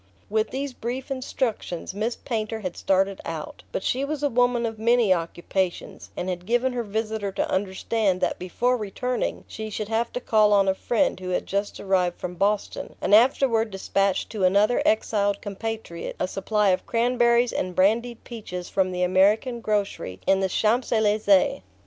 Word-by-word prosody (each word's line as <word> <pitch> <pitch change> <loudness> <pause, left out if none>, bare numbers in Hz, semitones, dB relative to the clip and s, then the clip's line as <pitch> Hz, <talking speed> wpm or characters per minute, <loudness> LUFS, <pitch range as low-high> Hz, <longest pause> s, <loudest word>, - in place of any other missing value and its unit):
With 220 0 +1
these 275 0 -4
brief 250 +3 -5
instructions 245 -9 -3
Miss 220 +4 -2
Painter 220 -2 -3
had 185 -3 -4
started 195 0 +1
out; 160 -2 -6
but - - -3
she 260 +2 0
was 295 +1 -3
a 290 - +3
woman 245 0 +2
of 225 -1 -4
many 230 -3 +4
occupations, 175 +2 -3
and 180 - -3
had 180 0 -4
given 245 +2 +1
her 245 - -1
visitor 215 -1 -3
to - - -1
understand 190 +1 0
that 185 - -1
before 240 +8 0
returning 245 +4 -3
she 220 0 -6
should 215 0 -4
have 230 +1 0
to - - -2
call 215 -3 +3
on 200 -1 +4
a 190 - +4
friend 240 +3 0
who 185 -1 -6
had 180 - -1
just 200 +1 -2
arrived 185 -3 0
from 180 0 -4
Boston, 200 +3 -1
and - - 0
afterward 230 0 +4
despatch 195 0 0
to 210 -4 -3
another 200 +6 +4
exiled 205 -2 +1
compatriot 210 -4 -5
a - - 0
supply 210 +2 +1
of 185 - 0
cranberries 240 0 +2
and 185 -1 -2
brandied 230 +5 +1
peaches 180 -7 -7
from 185 -1 +1
the 180 0 -1
American 205 +7 +3
grocery 205 - -2
in 195 - +3
the 190 -1 0
Champs 225 +6 +1
Elysees. 210 - +3
210 Hz, 175 wpm, -25 LUFS, 190-235 Hz, -, many